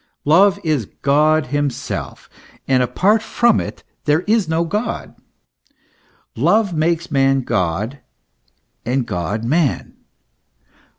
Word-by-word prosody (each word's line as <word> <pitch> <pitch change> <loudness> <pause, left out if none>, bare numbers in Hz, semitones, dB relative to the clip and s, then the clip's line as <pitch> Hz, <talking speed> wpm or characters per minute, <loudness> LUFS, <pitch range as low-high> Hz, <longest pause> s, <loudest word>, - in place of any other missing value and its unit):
Love 185 +6 +4
is 150 -8 0 0.2
God 150 +2 +3
himself, 145 -3 -3 0.4
and 130 -1 +3
apart 185 - +2
from 235 0 +2
it - - -8 0.2
there 150 +2 +2
is 210 -3 +1
no 165 +1 +1
God. 210 +7 -3 1.2
Love 210 -4 +2
makes 165 +1 -1
man 135 -1 +2
God, 105 +5 -2 0.8
and 125 +1 -1
God 95 +5 -3
man. 145 +3 0
150 Hz, 105 wpm, -19 LUFS, 130-175 Hz, 1.2 s, Love